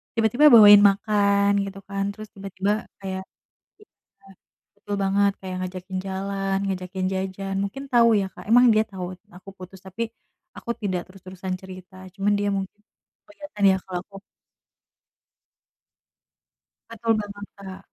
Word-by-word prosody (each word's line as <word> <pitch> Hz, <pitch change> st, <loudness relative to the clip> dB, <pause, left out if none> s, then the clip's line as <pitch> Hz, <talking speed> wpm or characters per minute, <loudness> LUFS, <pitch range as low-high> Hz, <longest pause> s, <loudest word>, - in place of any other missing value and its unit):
tiba-tiba 230 Hz, +6 st, +4 dB
bawain 210 Hz, -6 st, +9 dB
makan 200 Hz, 0 st, +3 dB
gitu 195 Hz, 0 st, -9 dB
kan, 195 Hz, 0 st, -4 dB
terus 215 Hz, 0 st, -10 dB
tiba-tiba 195 Hz, +2 st, -3 dB, 0.2 s
kayak 190 Hz, 0 st, -4 dB, 0.6 s
iya, 195 Hz, -, -22 dB, 0.4 s
betul 205 Hz, 0 st, -5 dB
banget. 200 Hz, +1 st, +2 dB
Kayak 185 Hz, -1 st, -6 dB
ngajakin 185 Hz, +1 st, -5 dB
jalan, 195 Hz, 0 st, -2 dB
ngajakin 185 Hz, 0 st, -3 dB
jajan 190 Hz, +1 st, -4 dB
mungkin 270 Hz, +8 st, -6 dB
tau 235 Hz, -1 st, +5 dB
ya 195 Hz, -, -2 dB
Kak, -, -, -11 dB
emang 245 Hz, +2 st, +7 dB
dia 215 Hz, 0 st, +3 dB
tau 185 Hz, -2 st, -5 dB, 0.3 s
aku 185 Hz, +2 st, -12 dB
putus, 185 Hz, +1 st, -11 dB
tapi 190 Hz, +5 st, -5 dB, 0.5 s
aku -, -, -8 dB
tidak 185 Hz, -3 st, -1 dB
terus-terusan 185 Hz, 0 st, -7 dB
cerita, 185 Hz, 0 st, -12 dB, 0.2 s
cuman 200 Hz, +1 st, 0 dB
dia 205 Hz, 0 st, 0 dB
mungkin 195 Hz, +2 st, -7 dB, 0.5 s
kelihatan 295 Hz, -9 st, -6 dB
ya -, -, +1 dB
kalo 185 Hz, -1 st, -6 dB
aku 195 Hz, -1 st, -12 dB, 2.7 s
Betul 230 Hz, 0 st, -2 dB
banget 205 Hz, -1 st, -7 dB
Kak, 190 Hz, -1 st, -9 dB
195 Hz, 135 wpm, -24 LUFS, 190-205 Hz, 2.7 s, bawain